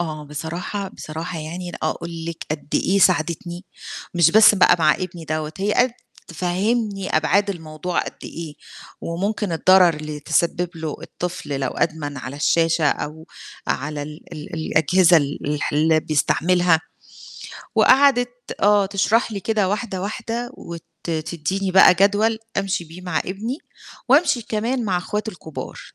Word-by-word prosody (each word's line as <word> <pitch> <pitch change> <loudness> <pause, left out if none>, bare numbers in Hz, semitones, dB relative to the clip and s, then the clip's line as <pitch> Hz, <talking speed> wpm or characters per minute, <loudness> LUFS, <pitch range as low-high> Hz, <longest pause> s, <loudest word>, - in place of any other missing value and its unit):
آه، 155 -3 -4
بصراحة، 170 +7 -5
بصراحة 165 0 -6
يعني 170 +3 -6
أنا - - -8
أقول 170 -1 -6
لِك 165 -1 -6
قد 150 -1 -4
إيه 195 +2 +2
ساعدِتني، 175 0 +1 0.5
مش 170 -2 +5
بس 215 +1 +7
بقى 190 - +5
مع 155 -2 +4
ابني 175 -3 -6
دَوّة، 155 0 -3
هي 205 +2 0
قد 250 0 +4 0.4
تفهّمني 195 +4 -1
أبعاد 200 +6 +2
الموضوع 160 -1 -4
قد - - -6
إيه، 160 -3 -7 0.5
وممكن 195 +2 -2
الضَرر 180 +1 +5
اللي 150 -1 -6
تسبب 170 +3 0
له 160 -2 -4
الطفل 175 -6 -5
لو 130 - 0
أدمن 155 -3 -2
على 130 +1 -6
الشاشة 165 +1 +2
أو 155 +3 -4 0.4
على 145 +1 -2
ال 150 +1 -9
ال 150 +2 -8
الأجهزة 165 +3 +4
ال 145 -2 0
الح 150 0 -1
اللي 155 +2 +3
بيستعملها، 170 +2 +2 0.9
وقعدِت 260 -3 +5 0.3
آه 205 -1 +5
تشرح 210 +4 +1
لي 200 - -4
كده 210 -3 +1
واحدة 205 -2 -2
واحدة، 230 +3 -4
وت 170 -1 -9 0.2
تدّيني 170 +3 -2
بقى 185 0 +7
جدول 205 +4 +3 0.2
أمشي 195 -3 -1
بيه 165 +3 -12
مع 180 -4 -1
ابني، 220 - -4 0.5
وأمشي 275 -3 +4
كمان 230 +3 -1
مع 185 -3 0
أخواته 210 +4 -3
الكُبار. 160 -4 -8
175 Hz, 145 wpm, -21 LUFS, 155-200 Hz, 0.9 s, بس